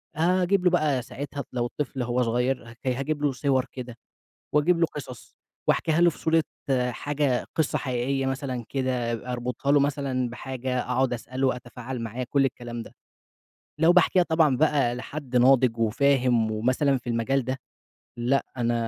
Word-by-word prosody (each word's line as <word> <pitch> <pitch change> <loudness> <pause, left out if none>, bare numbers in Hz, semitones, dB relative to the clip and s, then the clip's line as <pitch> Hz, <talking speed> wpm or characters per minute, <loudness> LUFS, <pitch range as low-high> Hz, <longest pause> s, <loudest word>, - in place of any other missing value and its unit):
أجيب 180 +3 +2
له 180 - +5
بقى 150 -7 +2
ساعتها 140 +2 -6
لو 120 -1 0
الطفل 135 +1 -4
لو 125 - 0
هو 125 +1 0
صغير 125 +2 0
ه 115 - -13
هاجيب 135 +4 -1
له 145 - +3
صور 130 0 +1
كده، 125 -2 -7 0.6
واجيب 165 +4 +4
له 165 - +5
قصص 130 -6 -9 0.3
وأحكيها 160 +1 +2
له 175 0 +6
في - - -13
صورة 160 0 +2 0.5
حاجة 140 0 -1
قصة 160 -3 +1
حقيقية 130 +1 -1
مثلًا 130 -3 -3
كده 130 -3 -1 0.2
أربطها 125 +3 -1
له 145 - +5
مثلًا 135 -3 0
بحاجة، 125 0 -3
أقعد 125 0 0
أسأله 130 +3 -2
وأتفاعل 125 0 -4
معاه، 115 +3 -4
كُلّ 140 -1 +3
الكلام 120 -2 -4
ده، - - -13 0.9
لو 165 +2 +6
باحكيها 180 +1 +5
طبعًا 160 -5 +3
بقى 145 -5 +2
لحد 130 0 -6
ناضج 125 -1 +5
وفاهم 120 0 +2
ومثلًا 130 +6 +1
في 120 -1 -7
المجال 120 +3 0
ده، 130 +1 -2 0.6
لأ 130 +4 +1
أنا 120 -1 +1
130 Hz, 160 wpm, -26 LUFS, 120-145 Hz, 0.9 s, له